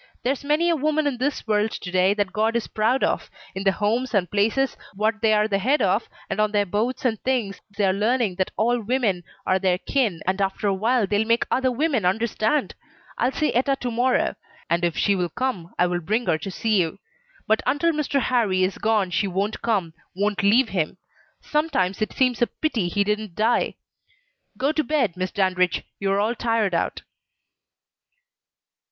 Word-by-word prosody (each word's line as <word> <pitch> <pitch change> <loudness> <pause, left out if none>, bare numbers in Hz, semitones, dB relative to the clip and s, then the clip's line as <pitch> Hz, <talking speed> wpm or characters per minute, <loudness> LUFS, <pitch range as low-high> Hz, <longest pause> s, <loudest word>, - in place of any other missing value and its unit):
There's 265 +3 -1
many 305 +4 +2
a - - +2
woman 305 +1 0
in 270 -4 -1
this 280 +2 -1
world 210 -1 +1
to 180 -4 -7
day 185 +2 +3
that 205 -2 -1
God 220 +3 +1
is 235 - 0
proud 225 +5 0
of; - - 0 0.2
in 190 +1 -4
the 195 - +4
Homes 225 +5 -1
and 180 -4 +1
places 225 +6 +1 0.2
what 215 +2 0
they're 215 -1 +3
the 200 -2 0
head 270 +9 +2
of, 200 0 +1 0.2
and - - -3
on 215 0 +1
their 205 -1 +2
boards 220 +8 -2
and 225 -4 0
things 240 -7 -1 0.2
they 205 - +2
are 190 - +3
learning 215 -1 0
that 190 - 0
all 240 +2 +2
women 215 -6 0 0.2
are 185 0 +2
their 185 -1 +2
kin, 215 - -1
and 190 +2 0
after 195 +2 -1
a 200 - +3
while 225 +4 +2
they'll 205 +3 0
make 230 +1 +2
other 260 0 +2
women 265 - 0
understand. 220 +7 0 0.5
I'll 250 - +2
see 305 +2 0
Etta 265 +3 +2
to 245 - -2
morrow, 245 +3 +1 0.4
and 170 +1 +2
if 170 -2 0
she 200 - +3
will 180 -2 -1
come 195 -5 -3
I 180 - +4
will 175 0 -1
bring 215 +8 -1
her 160 - +1
to 195 - -5
see 210 +1 +1
you. 165 0 -3 0.5
But 220 - +2
until 290 +6 +2
Mr. 300 -2 0
Harrie 215 -8 +1
is 185 +1 -1
gone 215 -4 +1
she 200 - +1
won't 195 +3 -2
come 195 -8 0 0.2
won't 205 +1 0
leave 225 +5 +4
him. 165 -5 -2 0.4
Sometimes 255 - 0
it 215 - -1
seems 250 -4 +1
a 240 - +4
pity 235 - -1
he 200 +3 +1
didn't 210 -3 -2
die. 225 +3 +1 0.8
Go 275 +3 +1
to 310 0 0
bed, 255 - 0
Miss 185 0 -2
Dandridge! 185 -3 +1 0.2
you 195 -1 0
are 195 - +2
all 215 +3 +1
tired 225 -5 0
out." 170 - -1
215 Hz, 195 wpm, -23 LUFS, 195-250 Hz, 0.8 s, the